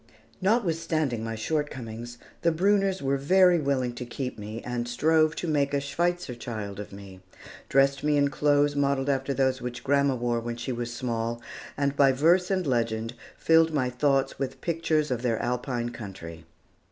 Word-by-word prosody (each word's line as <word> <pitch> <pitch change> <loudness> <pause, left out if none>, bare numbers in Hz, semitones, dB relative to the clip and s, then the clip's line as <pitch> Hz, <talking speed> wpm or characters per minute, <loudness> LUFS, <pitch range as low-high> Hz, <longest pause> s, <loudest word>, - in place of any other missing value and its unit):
Notwithstanding 165 - 0
my 115 0 -3
shortcomings, 120 -3 -4 0.2
the 170 - +3
Brunners 195 +1 +2
were 135 0 +1
very 180 +5 +4
willing 135 -4 0
to 120 - -6
keep 125 +2 -5
me, 105 +2 -6
and 120 -1 -3
strove 155 +5 +2
to 175 - -4
make 145 -2 +1
a - - +2
"Schweitzer 170 +2 -1
child" 110 -4 -6
of 105 - -7
me, 100 -1 -11 0.5
dressed 135 +1 +3
me 150 0 +2
in 140 0 +3
clothes 145 +1 +2
modelled 140 -1 +1
after 135 0 0
those 130 -1 +1
which 125 0 -5
grandma 140 -1 +2
wore 120 -1 -1
when 120 0 -5
she 120 +2 -4
was 120 -1 -3
small, 115 -1 -2 0.4
and 140 0 0
by 140 -1 +5
verse 170 +7 +3
and 185 -2 0
legend 115 -3 -1 0.2
filled 160 -1 +4
my 130 -3 +1
thoughts 135 +1 +1
with 135 -1 -3
pictures 160 -2 0
of 120 -2 -1
their 120 -3 0
Alpine 120 0 -2
country. 90 -8 -9
135 Hz, 170 wpm, -27 LUFS, 120-150 Hz, 0.5 s, by